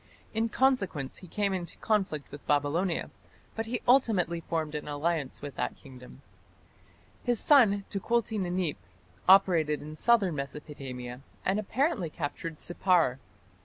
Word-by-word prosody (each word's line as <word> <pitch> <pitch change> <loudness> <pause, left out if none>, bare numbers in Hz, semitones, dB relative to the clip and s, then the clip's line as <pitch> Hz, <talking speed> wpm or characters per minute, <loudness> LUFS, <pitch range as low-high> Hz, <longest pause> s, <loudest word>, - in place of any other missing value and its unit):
In 225 +1 +1
consequence 210 - +1
he 185 - -12
came 200 +2 0
into 175 -2 -5
conflict 190 -9 -1
with 145 +1 -11
Babylonia, 150 +5 +1 0.4
but 225 0 -3
he 245 +1 -3
ultimately 215 -10 +3
formed 160 -2 -2
an 150 -1 -4
alliance 145 -1 -2
with 145 -1 -5
that - - -2
kingdom. 130 -3 -14 1.0
His 240 -3 +1
son, 210 -9 +5
Tukulti 220 +2 0
Ninip, 180 - -1 0.5
operated 170 -6 +5
in 155 +1 -8
southern 205 -2 +4
Mesopotamia, 135 -3 -6 0.2
and 195 +3 +2
apparently 215 - 0
captured 155 +1 -5
Sippar. 175 -7 +2
175 Hz, 130 wpm, -29 LUFS, 150-210 Hz, 1.0 s, son